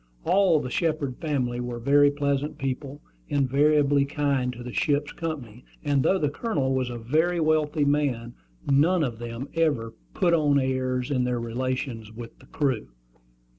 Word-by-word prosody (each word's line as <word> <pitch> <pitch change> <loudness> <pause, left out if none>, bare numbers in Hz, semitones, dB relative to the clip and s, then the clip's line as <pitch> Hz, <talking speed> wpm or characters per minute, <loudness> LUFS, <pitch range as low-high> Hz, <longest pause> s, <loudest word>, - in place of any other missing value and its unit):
All 185 -5 +4
the 125 -3 -5
Shepard 155 -6 -1
family 130 -6 -1
were 120 -1 -4
very 140 +4 +4
pleasant 145 0 -1
people, 135 +2 -4 0.3
invariably 145 +1 +3
kind 140 -3 0
to 120 0 -9
the 125 -1 -7
ship's 145 -1 0
company; 130 -9 -6 0.2
and 145 -2 +2
though 190 - +3
the 150 -5 0
Colonel 145 - -1
was 130 -1 0
a 120 - -5
very 160 +10 +1
wealthy 155 -1 +2
man, 135 -5 0 0.3
none 155 +5 +3
of 120 -5 -3
them 120 +3 -6
ever 145 -9 0 0.2
"put 175 - +2
on 145 -3 +3
airs" 130 -1 -1
in 130 -3 +1
their 125 -1 -1
relations 120 -1 -3
with 115 +1 -10
the 130 - -18
crew. 135 - -1
140 Hz, 160 wpm, -26 LUFS, 125-150 Hz, 0.3 s, All